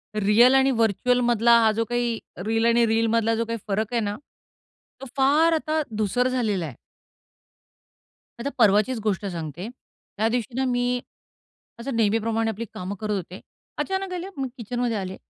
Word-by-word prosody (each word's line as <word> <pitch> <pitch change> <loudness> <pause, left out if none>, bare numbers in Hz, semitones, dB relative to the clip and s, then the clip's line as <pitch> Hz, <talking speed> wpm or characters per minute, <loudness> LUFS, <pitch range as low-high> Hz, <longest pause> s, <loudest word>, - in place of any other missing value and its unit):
Real 215 +5 +5
आणि 270 0 +4
virtual 230 +2 +2
मधला 235 0 +5
हा 220 -1 +4
जो 225 +1 0
काही, 240 -1 -1 0.3
रिअल 225 +1 +1
आणि 235 0 +4
रीलमधला 225 0 +2
जो 230 - -1
काही 230 0 -3
फरक 215 +3 -1
आहे 235 - +1
ना, 205 -1 -2 0.9
तो - - -6
फार 300 +5 +4
आता 315 0 0 0.2
धूसर 220 +4 +1
झालेला 220 -9 -1
आहे. 140 -6 -8 1.6
आता 280 +4 -2
परवाचीच 215 +3 +4
गोष्ट 205 -1 -1
सांगते. 170 0 -5
त्या 225 -3 -6
दिवशी 235 0 -2
ना, 265 - 0
मी 245 0 0 0.8
असं 250 +2 -4
नेहमीप्रमाणे 225 +1 +1
आपली 220 +2 -6
कामं 185 +2 -5
करत 210 -1 -2
होते. 185 0 -6 0.4
अचानक 385 -1 -2
आले 360 +1 -4
मी 270 -1 -2
किचनमध्ये 240 0 -2
आले. 190 -1 -4
230 Hz, 155 wpm, -24 LUFS, 210-250 Hz, 1.6 s, रिअल